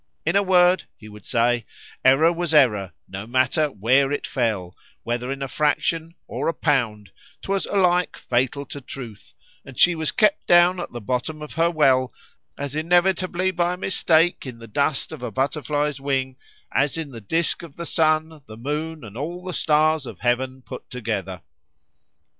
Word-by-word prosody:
—In 165 +4 +1
a 200 - +5
word, 180 -1 +4
he 110 - -13
would 105 0 -13
say, 120 0 +1 0.4
error 150 +6 +5
was 170 -2 -1
error,—no 100 - +1
matter 130 +5 +2
where 135 +3 +2
it 145 - -2
fell,——whether 120 +2 -3
in 135 0 -4
a - - -3
fraction,——or 160 +4 -1
a 165 - 0
pound,—'twas 130 - -2
alike 180 -2 +2
fatal 130 +3 -1
to 140 - -8
truth, 120 -4 -10 0.3
and 135 - -13
she 175 - +6
was 160 -2 -1
kept 210 -2 +2
down 175 +1 +5
at 175 - -5
the 120 - -6
bottom 130 +7 -3
of 150 - -9
her 165 +1 +2
well, 130 -6 +3 0.5
as 140 -1 -4
inevitably 180 +3 +1
by 175 0 0
a - - -15
mistake 175 -4 +2
in 125 -2 -7
the 115 - -11
dust 140 +6 0
of - - -8
a 125 - -3
butterfly's 145 +3 -1
wing,——as 135 +1 -2
in 155 -4 -5
the 115 -3 -9
disk 160 +10 0
of 165 -4 -11
the 170 - -6
sun, 155 -1 +1
the 110 - -10
moon, 150 +4 -4
and 110 -1 -10
all 170 +7 -5
the 185 -1 -5
stars 155 -2 +2
of - - -8
heaven 130 +2 -1
put 125 - -10
together. 105 -7 -4
145 Hz, 165 wpm, -23 LUFS, 125-165 Hz, 0.5 s, she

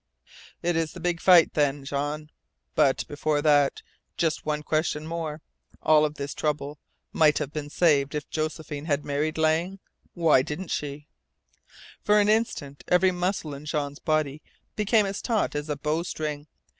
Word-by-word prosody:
"It 175 0 +1
is 165 -1 -1
the - - -9
big 175 -1 -1
fight 180 -3 +6
then, 145 -2 0
Jean. 145 +2 -3 0.4
But, 135 -2 +2
before 145 0 -1
that, 145 -2 +3 0.3
just 160 -2 -1
one 150 0 -1
question 155 0 -1
more. 160 -2 -4 0.4
All 155 -1 +5
of 150 0 -3
this 140 0 -5
trouble 150 -1 -2 0.3
might 155 -2 +4
have 150 -1 -3
been 150 -1 -4
saved 145 -4 +2
if 150 -1 -3
Josephine 155 -1 -4
had 145 -2 -1
married 150 +2 -1
Lang. 160 +4 +1 0.4
Why 165 -6 +4
didn't 155 +7 -5
she?" 145 0 -4 1.0
For 210 0 +4
an 205 0 +3
instant 215 -11 -1
every 180 +1 +4
muscle 180 -4 -2
in 140 +2 -9
Jean's 145 -2 -3
body 155 -2 0 0.3
became 210 0 +3
as 195 0 -4
taut 225 -4 0
as 145 +1 -4
a 150 - -2
bowstring. 150 -1 -3
155 Hz, 155 wpm, -26 LUFS, 145-170 Hz, 1.0 s, fight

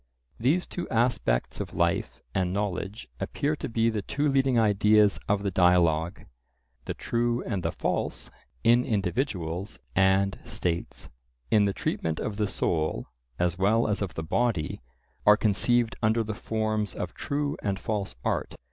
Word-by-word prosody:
These 145 +10 +2
two 175 - -5
aspects 115 - +1
of - - -5
life - - 0
and 90 -1 0
knowledge 100 +1 -3
appear 150 +2 -1
to - - -4
be 115 0 +2
the 110 -2 -2
two 145 +8 -1
leading 135 -2 +3
ideas 105 -1 +4
of 100 -1 +2
the 100 - 0
dialogue. 85 -2 +3 0.6
The - - -3
true 120 0 0
and 95 - -2
the - - -1
false - - -2 0.3
in 120 +1 +5
individuals 100 - -2 0.2
and 95 +1 +3
states, 85 -6 -3 0.4
in 105 -2 +5
the 100 - +2
treatment 80 -3 -2
of 105 -2 -3
the 105 -1 +1
soul 80 -8 -1 0.3
as 90 +1 0
well 110 +5 +3
as 105 -2 -1
of 100 -3 -3
the 80 - -3
body, 85 - 0 0.5
are 105 0 +8
conceived 115 +3 +2
under 115 +1 +2
the 110 0 -4
forms 110 -1 -2
of - - -4
true 145 0 -2
and 100 -1 -1
false 100 - -3
art. - - -1
105 Hz, 155 wpm, -27 LUFS, 95-115 Hz, 0.6 s, are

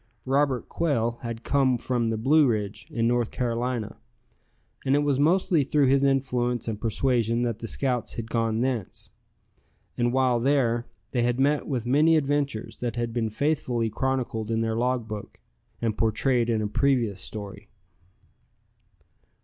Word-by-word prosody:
Robert 135 -1 +1
Quail 120 -8 -1
had 115 -1 -6
come 135 -3 +2
from 120 -1 -1
the 115 -1 -1
Blue 145 +6 +4
Ridge, 105 -3 -2
in 115 -1 0
North 120 -1 +1
Carolina, 120 -2 -2 0.9
and 135 +1 +2
it 145 - +2
was 140 -2 +1
mostly 170 +1 +3
through 145 +1 +2
his 135 +1 +3
influence 125 -3 0
and 110 -2 -4
persuasion 115 0 +1
that 115 -3 -2
the 115 - -5
scouts 125 0 -2
had 115 -1 -6
gone 115 -1 0
thence. 125 -6 -3 0.9
And 120 0 +2
while 130 -2 +2
there, 120 -3 +1 0.2
they 125 - 0
had 120 +1 0
met 145 +2 +2
with 125 -5 -2
many 150 +6 +4
adventures 140 -5 -1
that 120 -2 -3
have 120 -1 -2
been 115 -2 -1
faithfully 120 -3 -1
chronicled 125 -2 -2
in 115 0 0
their 110 0 -1
log 125 0 0
book, 105 -2 -7 0.4
and 110 -2 0
portrayed 120 +2 +1
in 110 -2 +1
a - - 0
previous 115 -5 +1
story. 100 0 -8
120 Hz, 155 wpm, -26 LUFS, 115-135 Hz, 0.9 s, Blue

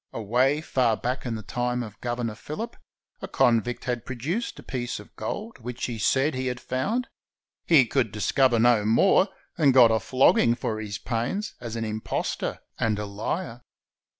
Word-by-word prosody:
Away 125 +7 +1
far 125 -7 +1
back 125 +1 -3
in 115 - -2
the 110 - -6
time 125 +2 -2
of 105 -3 -11
Governor 120 -2 -2
Phillip 215 - -6 0.5
a - - -5
conNdct 120 0 +2
had 120 -2 -2
produced 145 - -3
a - - -11
piece 120 -4 -4
of 105 - -15
gold 210 - -5
which 125 +1 -5
he 120 -3 -4
said 135 +7 +2
he 130 0 -2
had 125 0 -3
found. 200 - -1 0.6
He 150 -7 +6
could 120 -2 0
discover 120 +4 +2
no 115 -2 +4
more, 185 - +4 0.3
and 140 -4 +4
got 120 -3 +8
a 110 - +3
flog 130 +4 +4
ging 120 0 +4
for 110 -3 -3
his 105 -1 -4
pains, 125 - -2
as 115 -2 -5
an 115 -1 -2
impostor 110 0 -3 0.2
and 110 -2 +1
a 105 - -3
Har. 115 - -4
120 Hz, 180 wpm, -26 LUFS, 115-130 Hz, 0.6 s, got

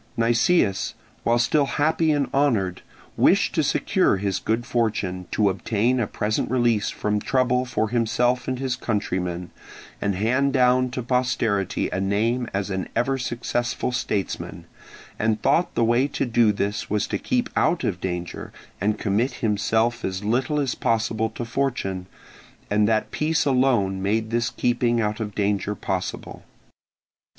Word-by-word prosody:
Nicias, 115 - +2 0.3
while 120 +1 +2
still 140 +4 +2
happy 155 +2 +2
and 145 -2 +1
honoured, 110 -11 +1 0.4
wished - - +4
to - - +2
secure - - +2
his 100 -1 -1
good 115 +2 -1
fortune, 100 -7 -1
to 105 - +2
obtain 110 +6 +1
a 115 - 0
present 105 +2 -1
release 120 -4 +2
from 105 0 -1
trouble 130 0 +1
for 110 -3 -1
himself 120 +1 +1
and 130 -1 -1
his 130 -1 -1
countrymen, 90 -7 -2 0.5
and 100 -2 0
hand 130 +8 +1
down 125 -1 +3
to 125 0 -4
posterity 120 -5 0
a 95 - -1
name 115 +5 0
as 100 0 -2
an 95 -1 -3
ever 135 +3 +1
successful 120 0 -2
statesman, 105 -7 -3 0.5
and 110 0 0
thought 175 - +2
the 120 - +2
way 120 +4 +3
to 140 - -2
do 120 -3 +3
this 100 +1 -2
was 105 0 +1
to - - -3
keep 250 -1 0
out 170 - +2
of 90 -4 -2
danger 90 -2 -4 0.3
and 105 +2 +1
commit 110 +6 0
himself 110 +2 0
as 95 +1 -3
little 130 +7 0
as 135 -3 0
possible 110 -1 0
to 120 +1 -6
fortune, 115 -8 -2 0.6
and 105 0 +3
that 110 -1 +1
peace 160 +1 0
alone 125 -8 +2
made 110 +3 0
this 120 0 +1
keeping 120 -1 +1
out 105 0 -1
of 105 -2 -4
danger 105 0 0
possible. 95 -1 -4
115 Hz, 150 wpm, -24 LUFS, 100-125 Hz, 0.6 s, wished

